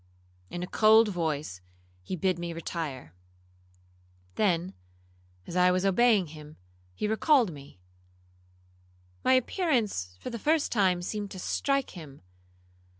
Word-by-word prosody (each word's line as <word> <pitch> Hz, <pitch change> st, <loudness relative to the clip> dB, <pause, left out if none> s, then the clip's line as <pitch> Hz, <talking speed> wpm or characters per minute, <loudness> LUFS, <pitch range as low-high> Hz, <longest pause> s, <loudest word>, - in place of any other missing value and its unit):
In 175 Hz, -, -5 dB
a -, -, -2 dB
cold 220 Hz, +3 st, +5 dB
voice 155 Hz, -, -3 dB, 0.4 s
he 140 Hz, -, -5 dB
bid 185 Hz, 0 st, 0 dB
me 170 Hz, -1 st, -4 dB
retire; 155 Hz, -, -5 dB, 1.2 s
then, 180 Hz, -, 0 dB, 0.7 s
as 170 Hz, -, -8 dB
I 180 Hz, 0 st, +5 dB
was 185 Hz, +1 st, +1 dB
obeying 200 Hz, -3 st, +3 dB
him, 150 Hz, -1 st, -12 dB, 0.4 s
he 210 Hz, -, -2 dB
recalled 230 Hz, -, +3 dB
me,—my 140 Hz, -2 st, -12 dB, 1.6 s
appearance 240 Hz, -, 0 dB
for -, -, -6 dB
the 235 Hz, -, -5 dB
first 310 Hz, +5 st, +1 dB
time 185 Hz, -5 st, +2 dB
seemed 205 Hz, +2 st, -4 dB
to 185 Hz, -, -8 dB
strike 275 Hz, +7 st, -1 dB
him. 145 Hz, -, -12 dB
185 Hz, 120 wpm, -28 LUFS, 160-220 Hz, 1.6 s, cold